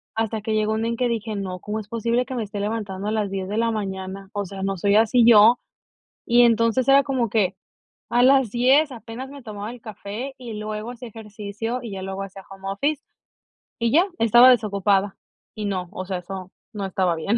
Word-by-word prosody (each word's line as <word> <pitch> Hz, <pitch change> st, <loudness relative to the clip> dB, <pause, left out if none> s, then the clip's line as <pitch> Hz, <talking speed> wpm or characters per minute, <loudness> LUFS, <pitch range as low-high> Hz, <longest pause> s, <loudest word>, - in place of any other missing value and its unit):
hasta 220 Hz, -1 st, -1 dB
que 220 Hz, 0 st, -2 dB
llegó 215 Hz, 0 st, +1 dB
un 220 Hz, -, -1 dB
día 230 Hz, -, 0 dB
en 235 Hz, -, -3 dB
que 250 Hz, 0 st, +1 dB
dije: 225 Hz, -2 st, -3 dB
"No, 185 Hz, -2 st, -4 dB
¿cómo 210 Hz, +4 st, -4 dB
es 205 Hz, -, -9 dB
posible 235 Hz, +2 st, 0 dB
que 260 Hz, 0 st, -6 dB
me 235 Hz, -, -1 dB
esté 205 Hz, 0 st, -6 dB
levantando 205 Hz, -2 st, -3 dB
a -, -, 0 dB
las 215 Hz, -2 st, -1 dB
10 190 Hz, -1 st, -3 dB
de 210 Hz, -, -2 dB
la 230 Hz, 0 st, +2 dB
mañana?", 195 Hz, -2 st, -5 dB
o 205 Hz, -1 st, -2 dB
sea, 195 Hz, +1 st, -7 dB
no 195 Hz, -1 st, -1 dB
soy 200 Hz, +3 st, +2 dB
así 225 Hz, +2 st, +5 dB
yo, 230 Hz, +1 st, +7 dB, 0.7 s
y 240 Hz, 0 st, +5 dB
entonces 230 Hz, +1 st, +3 dB
era 275 Hz, 0 st, +6 dB
como 255 Hz, -5 st, -1 dB
que, 200 Hz, -3 st, +1 dB, 0.6 s
a 245 Hz, -, +3 dB
las 265 Hz, -2 st, +5 dB
10 265 Hz, +5 st, +3 dB
apenas 240 Hz, +3 st, -8 dB
me 280 Hz, -2 st, -11 dB
tomaba 210 Hz, -1 st, -6 dB
el 245 Hz, -, -10 dB
café 215 Hz, +4 st, -7 dB
y 240 Hz, -3 st, -7 dB
luego 215 Hz, +2 st, -5 dB
hacía 245 Hz, 0 st, -9 dB
ejercicio 215 Hz, +2 st, -5 dB
y 230 Hz, -4 st, -7 dB
ya 190 Hz, -1 st, -5 dB
luego 190 Hz, +1 st, -4 dB
hacía 195 Hz, 0 st, -9 dB
home 195 Hz, 0 st, -9 dB
office 285 Hz, +9 st, -1 dB, 0.8 s
y 230 Hz, -1 st, +1 dB
ya, 335 Hz, +7 st, +5 dB
estaba 240 Hz, +3 st, +7 dB
desocupada 200 Hz, -4 st, +2 dB, 0.4 s
y 215 Hz, -, -4 dB
no, 185 Hz, -3 st, -3 dB
o 185 Hz, -3 st, -6 dB
sea, 190 Hz, -1 st, -3 dB
eso 185 Hz, +1 st, -8 dB, 0.2 s
no 205 Hz, -2 st, -4 dB
estaba 185 Hz, -2 st, 0 dB
bien. 200 Hz, +8 st, 0 dB
215 Hz, 220 wpm, -23 LUFS, 195-235 Hz, 0.8 s, yo